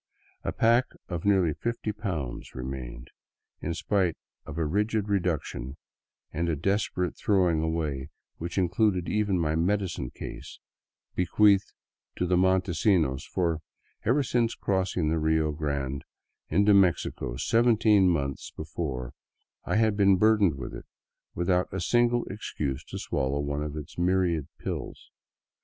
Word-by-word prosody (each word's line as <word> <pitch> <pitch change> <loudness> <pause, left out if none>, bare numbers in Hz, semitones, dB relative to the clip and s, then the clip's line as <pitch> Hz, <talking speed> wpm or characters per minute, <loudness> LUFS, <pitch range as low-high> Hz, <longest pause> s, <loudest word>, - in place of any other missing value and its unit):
A - - -1
pack 115 +3 +4 0.2
of 85 -1 -4
nearly 95 -6 +3
fifty 115 +3 -3
pounds 90 - -5
remained, 65 -1 -6 0.5
in 85 - -2
spite 95 -4 0 0.3
of 70 - -7
a 80 - +1
rigid 105 +5 0
reduction 85 -8 -2 0.6
and 85 +2 -1
a 80 - +1
desperate 90 +2 -1
throwing 90 -6 +2
away 75 -4 -2 0.3
which 85 +3 -5
included 95 0 +2
even 105 -2 +1
my 80 -2 +1
medicine 90 -5 0
case, - - -8 0.6
be 90 - 0
queathed 100 -2 +4 0.4
to 90 - -1
Montesinos, 90 -5 +2
for 85 -3 0 0.4
ever 135 +6 +3
since 120 -2 +1
crossing 95 -4 0
the 80 - +1
Rio 80 0 +2
Grande 70 -3 -3 0.5
into 100 +5 +4
Mexico 90 -10 +2
seventeen 110 - +4
months 70 -5 -1
before 70 -6 -4 0.5
I - - -1
had 110 -1 +3
been 100 -2 +5
burdened 105 -5 +4
with 65 - -7
it, - - -8 0.5
without 90 +1 +1
a 95 - -3
single 120 +5 +2
excuse 75 -9 -4
to - - -7
swallow 65 +2 -1
one 70 0 -2
of 75 0 -4
its 75 +3 -8
myriad 90 -4 +1
pills. - - -6
90 Hz, 135 wpm, -28 LUFS, 75-100 Hz, 0.6 s, been